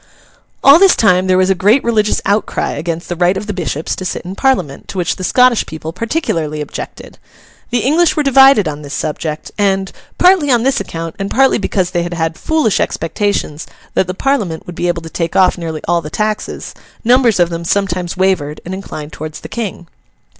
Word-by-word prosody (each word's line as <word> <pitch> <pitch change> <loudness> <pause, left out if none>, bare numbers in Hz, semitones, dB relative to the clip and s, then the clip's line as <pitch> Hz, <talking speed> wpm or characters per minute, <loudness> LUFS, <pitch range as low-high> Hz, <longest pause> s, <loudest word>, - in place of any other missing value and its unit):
All 280 +4 +8
this 390 -1 +6
time 185 -3 +3
there 185 0 +3
was 185 +1 +3
a - - +5
great 205 +8 +3
religious 215 -3 +1
outcry 205 +2 0
against 170 0 -4
the 175 - -3
right 175 +2 +2
of 205 - -5
the 210 - -4
Bishops 165 -4 -3
to - - -6
sit 180 - -4
in 180 +2 -6
Parliament; 195 - -1
to - - -7
which 175 -2 0
the 185 - -6
Scottish 250 +4 +3
people 160 0 -7
particularly 175 - -2
objected. 150 - -8 0.5
The 240 -1 0
English 315 +9 +2
were 300 - +2
divided 270 - +6
on 150 -1 -4
this 145 -1 -6
subject, 155 0 -4
and, 195 -1 +1 0.3
partly 360 -5 +4
on 240 -3 +3
this 270 +1 +2
account 165 -4 -6
and 195 0 -3
partly 270 -1 +3
because 185 -3 -1
they 175 - 0
had 175 0 -4
had 160 -1 -1
foolish 310 - 0
expectations 165 -2 -2 0.3
that 190 - +1
the 185 - -4
Parliament 205 - -1
would 175 - -8
be 175 - -1
able 175 -1 -1
to - - -8
take 165 -2 -3
off 185 -1 +4
nearly 160 -3 -5
all 170 0 +2
the 150 - -7
taxes, 215 +5 -3 0.3
numbers 240 -3 +4
of 175 -1 +3
them 170 0 -4
sometimes 180 -1 -1
wavered 185 -6 0
and 180 - -5
inclined 155 -6 -7
towards 155 0 -7
the - - -9
King. 215 -6 -5
185 Hz, 205 wpm, -15 LUFS, 165-225 Hz, 0.5 s, All